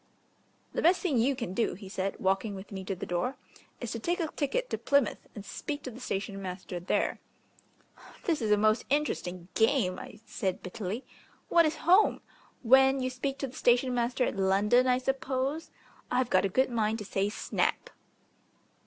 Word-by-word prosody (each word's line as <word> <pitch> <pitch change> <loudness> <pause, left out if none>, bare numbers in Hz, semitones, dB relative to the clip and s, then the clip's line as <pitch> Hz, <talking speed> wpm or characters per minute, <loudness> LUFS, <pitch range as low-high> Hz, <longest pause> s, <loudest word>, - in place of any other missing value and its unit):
"The - - -1
best 350 +3 +4
thing 300 - +1
you 265 +4 +2
can 235 -8 -4
do," 225 - 0
he 195 +1 -10
said, 195 0 -3
walking 195 +2 0
with 190 +2 -9
me 190 -1 -5
to 195 - -2
the - - -6
door, 180 +10 -1 0.4
"is 240 - -4
to 230 - -3
take 345 +9 -1
a 325 -3 -1
ticket 410 - -1
to - - -1
Plymouth, 280 -5 +2 0.2
and 205 - -8
speak 290 +6 -5
to 255 - -5
the 240 - -11
station 195 -4 -3
master 180 -1 -5
there 175 - 0 0.5
" - - -20
"This 325 -6 +1
is 220 - 0
a 210 - +5
most 215 +2 +3
interesting 185 - -1
game," 225 -5 +2
I 210 - -10
said 190 -5 -3
bitterly. 195 +5 -5 0.4
"What 335 -2 +5
is 310 - -1
'home'? 370 +6 +5 0.4
When 265 +2 +6
you 255 0 -1
speak 270 +2 -3
to 275 - -3
the 255 - -12
station 250 +1 +3
master 245 +1 +1
at - - -3
London, 205 +6 +3
I 250 0 +4
suppose? 270 +3 -2 0.4
I've 250 -1 0
a 185 +1 +4
good 260 +6 +2
mind 220 -1 +1
to 210 - -7
say 195 +1 0
'snap'!" 210 - -1
235 Hz, 190 wpm, -29 LUFS, 195-270 Hz, 0.5 s, When